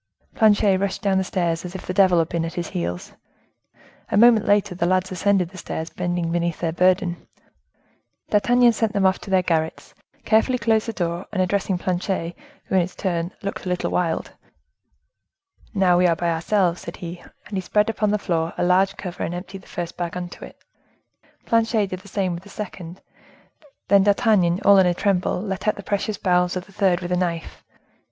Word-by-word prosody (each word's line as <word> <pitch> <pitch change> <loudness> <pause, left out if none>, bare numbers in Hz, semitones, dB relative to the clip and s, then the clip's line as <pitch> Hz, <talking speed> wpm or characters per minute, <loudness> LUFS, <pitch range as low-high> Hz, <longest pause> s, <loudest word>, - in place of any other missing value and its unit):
Planchet 205 -3 +4
rushed 195 -1 -2
down 195 -2 +2
the - - 0
stairs, 170 -3 -1
as 180 +1 -8
if 190 - -7
the 185 - -3
devil 185 -2 +4
had 165 -1 +2
been 170 0 -2
at 165 - -5
his 175 -2 -3
heels. 85 +1 -4 1.0
A - - +1
moment 230 -1 +6
later 205 -2 +2
the 175 -1 -1
lads 185 +1 +1
ascended 185 -1 +1
the 185 0 -11
stairs, 160 0 -5
bending 175 -2 -2
beneath 170 -1 -1
their 165 -2 -1
burden. 180 0 +1 1.0
D'Artagnan 240 +3 +4
sent 220 -1 -1
them 200 -1 +1
off 190 0 +3
to - - -10
their 190 -1 +3
garrets, 160 -2 -2 0.3
carefully 230 +3 +3
closed 220 -1 +1
the 225 - -3
door, 175 -2 -3
and 205 - -3
addressing 190 0 0
Planchet, 180 -1 -2 0.3
who, - - -7
in 190 - +5
his 175 +1 -4
turn, 175 -2 -2
looked 200 -1 -5
a - - -1
little 180 0 -1
wild,— 170 -2 -1 1.4
"Now, 180 -3 +4
we 180 - +4
are 170 - +2
by 170 +1 -1
ourselves," 175 +1 +1
said 170 - -8
he; 175 0 -7 0.3
and 205 - -7
he 190 - -1
spread 210 +3 +1
upon 215 -2 0
the 210 - +2
floor 165 -4 -2
a - - 0
large 190 +2 +3
cover, 180 -3 -7
and 175 - -2
emptied 190 +2 -8
the - - -20
first 175 -1 -6
bag 175 -1 -3
into 180 -1 -7
it. - - -11 0.9
Planchet 225 -3 +1
did 185 - -4
the 185 - -16
same 190 -2 -1
with 170 - -6
the 200 - -15
second; 185 -4 -8 0.9
then 200 0 +5
D'Artagnan, 200 -4 +3
all 200 -1 +7
in 185 - +5
a 175 - +1
tremble, 190 -2 0
let 195 +1 -4
out 210 - +3
the 200 - -9
precious 205 +1 -2
bowels 180 -1 +1
of 180 0 -4
the 200 - -19
third 185 -3 +2
with 175 0 -5
a - - +2
knife. 170 -2 -3
185 Hz, 205 wpm, -22 LUFS, 175-200 Hz, 1.4 s, all